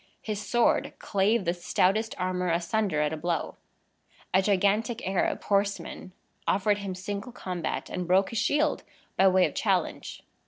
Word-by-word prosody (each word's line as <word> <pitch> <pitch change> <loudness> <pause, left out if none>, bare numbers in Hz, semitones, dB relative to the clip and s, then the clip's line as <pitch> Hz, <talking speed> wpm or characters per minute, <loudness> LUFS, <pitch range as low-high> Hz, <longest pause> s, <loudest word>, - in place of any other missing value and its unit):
His 210 -2 -3
sword 235 +4 +1
clave 200 +1 +1
the 170 - +1
stoutest 195 +5 +1
armor 180 0 -1
asunder 170 0 0
at 150 +1 0
a - - -3
blow. 170 +2 -2 0.8
A 190 - +5
gigantic 205 +3 +1
Arab 190 -1 0
horseman 200 -2 -1 0.4
offered 205 +1 +2
him 195 -2 -4
single 200 +5 -5
combat, 180 -7 -4
and 180 -1 -4
broke 190 +2 +3
his 230 - -1
shield 300 +1 +1 0.3
by 195 - +5
way 185 -1 +5
of - - -3
challenge. - - -1
195 Hz, 150 wpm, -27 LUFS, 180-210 Hz, 0.8 s, A